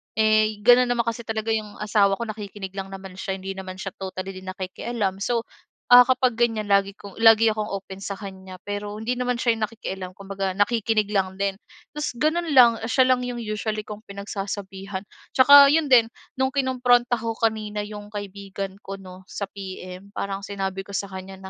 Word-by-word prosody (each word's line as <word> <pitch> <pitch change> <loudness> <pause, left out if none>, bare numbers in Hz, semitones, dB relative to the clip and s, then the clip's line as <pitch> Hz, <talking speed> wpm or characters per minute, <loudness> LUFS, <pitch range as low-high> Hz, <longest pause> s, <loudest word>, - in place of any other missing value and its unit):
Eh, 215 -1 +2
gano'n 245 +2 +6
naman 240 -1 +1
kasi 230 0 -4
talaga 220 0 -2
'yong 215 -2 -2
asawa 205 -2 +2
ko 235 - -4
nakikinig 205 -3 -7
lang 195 0 -5
naman 190 -1 -10
siya, 190 - -3
hindi 190 0 -6
naman 190 -1 -7
siya 195 +1 -6
totally 190 0 -5
din 185 0 -11
nakikialam. 190 +2 -3
So, 230 +3 0 0.5
ah, 245 0 +10
kapag 255 -2 +2
ganyan 220 -3 +1
lagi 200 0 +3
'kong 200 0 -12
lagi 225 0 +6
akong 215 -1 -3
open 195 -1 -6
sa 200 0 -5
kanya, 190 -2 -9
pero 205 0 -5
hindi 235 +4 -3
naman 250 0 0
siya 235 -1 +2
yung 215 - +1
nakikialam 190 -4 -6
kumbaga 195 -1 -4
nakikinig 215 0 +1
lang 190 -2 0
din. 195 0 -2 0.3
Tas 300 -4 -4
gano'n 315 +6 0
lang, 235 -3 +7
siya 260 +2 +4
lang 250 -1 +1
'yong 240 -1 -4
usually 215 0 -3
kong 210 +1 -10
pinagsasabihan. 195 -1 -6 0.3
Tsaka 280 +2 +9
'yon 295 0 +2
din 235 -3 +7 0.3
no'ng 265 +1 0
kinumpronta 245 -3 +2
ko 225 0 -3
kanina 215 -2 -1
'yong 205 0 -8
kaibigan 200 -1 -6
ko 195 - -4
'no 185 -1 -13
sa 200 -1 -5
PM, 190 0 -9
parang 195 0 -3
sinabi 195 -1 -3
ko 200 - -6
sa 200 -1 -3
kanya 190 0 -8
205 Hz, 185 wpm, -24 LUFS, 195-230 Hz, 0.5 s, ah